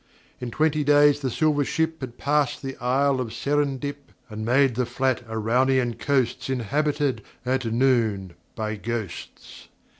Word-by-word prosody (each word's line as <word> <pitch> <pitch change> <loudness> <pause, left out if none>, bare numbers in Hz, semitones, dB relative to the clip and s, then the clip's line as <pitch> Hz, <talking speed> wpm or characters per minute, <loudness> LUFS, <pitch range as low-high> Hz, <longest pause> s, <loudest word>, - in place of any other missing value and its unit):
In 125 - -4
twenty 155 +4 +1
days 145 0 +5
the 135 -2 -2
silver 150 +3 +2
ship 160 +2 -1
Had 125 -2 -7
passed 145 -2 0
the 135 0 -4
Isle 135 +2 +1
of 115 -3 -4
Serendip, 145 -1 -2 0.2
And 110 0 -5
made 130 +3 +3
the 125 +1 -1
flat 130 -2 0
Araunian 120 +3 +1
coasts 130 -3 0
Inhabited, 140 +1 0 0.2
at 130 0 0
noon, 115 -6 +1 0.2
by 110 -1 -3
Ghosts. 110 -5 -6
130 Hz, 140 wpm, -24 LUFS, 120-145 Hz, 0.2 s, days